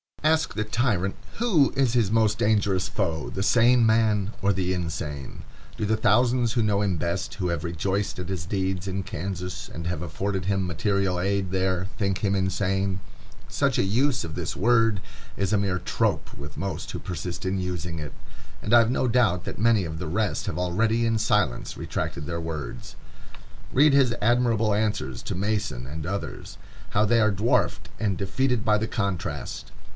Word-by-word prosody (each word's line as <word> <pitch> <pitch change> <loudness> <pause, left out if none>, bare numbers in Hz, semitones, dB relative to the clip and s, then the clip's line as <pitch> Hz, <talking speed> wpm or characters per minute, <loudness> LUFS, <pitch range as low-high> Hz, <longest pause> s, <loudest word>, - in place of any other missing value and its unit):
Ask 160 +1 +2
the 110 - 0
tyrant 105 -4 0 0.2
who 195 - +3
is 135 -4 +2
his 115 -6 +3
most 110 -1 +2
dangerous 100 -4 +2
foe, 85 -6 -2
the 95 - -3
sane 120 +2 +5
man 110 -2 +2
or 100 0 +3
the 95 0 0
insane? 75 -5 -4 0.3
Do 110 - -1
the 110 +1 +1
thousands 120 +2 +3
who 120 -2 +2
know 105 -1 +2
him 95 -4 +1
best, 85 +1 -2
who 90 - -1
have 85 -3 -2
rejoiced 95 +4 -1
at 90 0 -5
his 90 -4 -3
deeds 95 -1 -2
in 95 0 -2
Kansas, 90 +1 -5
and 85 - -7
have 85 -3 -2
afforded 95 +3 -3
him 95 -1 +1
material 95 +1 0
aid 95 0 0
there, 95 -1 0
think 100 -2 0
him 100 -2 +1
insane? 95 0 0 0.5
Such - - +1
a - - +3
use 125 +7 +1
of 80 - -6
this - - -3
word 115 -1 +3 0.4
is 100 0 0
a - - +4
mere 95 -2 0
trope - - -1
with 75 +1 -9
most 95 -5 -4
who - - -4
persist 90 +1 -5
in 95 +1 0
using 85 -2 -3
it, 75 -2 -6 0.5
and 105 - -1
I 120 - +9
have 115 0 +3
no 130 - +1
doubt 110 -8 +2
that - - -6
many 110 -2 +4
of 80 0 -5
the 90 - -4
rest 95 0 -1
have - - -2
already 110 +6 +1
in 115 0 +2
silence 105 - 0
retracted 75 - -3
their 85 +2 -3
words. 85 +7 -6 0.8
Read 145 +2 +5
his 130 -4 +4
admirable 115 -2 +3
answers 105 - -1
to - - -3
Mason 100 - -1
and 75 +3 -6
others. 100 +2 -5 0.3
How 105 +1 +3
they 115 +2 +3
are 110 -1 +4
dwarfed 105 +5 +1
and 100 -4 0
defeated 125 +4 0
by 105 -2 +3
the 110 - -1
contrast! 95 - -3
100 Hz, 180 wpm, -26 LUFS, 90-110 Hz, 0.8 s, I